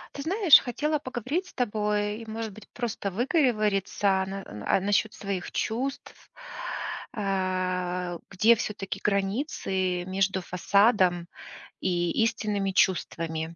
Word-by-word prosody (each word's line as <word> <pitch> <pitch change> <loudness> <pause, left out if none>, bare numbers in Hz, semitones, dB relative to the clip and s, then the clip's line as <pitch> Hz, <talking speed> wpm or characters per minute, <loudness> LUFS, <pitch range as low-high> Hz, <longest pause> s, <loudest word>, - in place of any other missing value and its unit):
Ты 280 - -4
знаешь, 360 +2 +6
хотела 300 +5 -1
поговорить 275 - -3
с - - -15
тобой 210 -2 -1
и, 230 - -9
может 220 -1 -4
быть, 215 - -14
просто 225 -5 -3
выговориться 210 - +1
на 195 0 -6 0.2
а, - - +3
насчет 205 +2 +1
своих 195 -3 -4
чувств. 260 +5 -4 0.8
А, 185 -3 -1
где 215 +5 +5
всё-таки 205 -3 -4
границы 195 - -1
между 190 0 0
фасадом 185 -1 +3 0.5
и 175 -2 0
истинными 205 -3 0
чувствами? 165 -3 0
200 Hz, 110 wpm, -27 LUFS, 185-230 Hz, 0.8 s, знаешь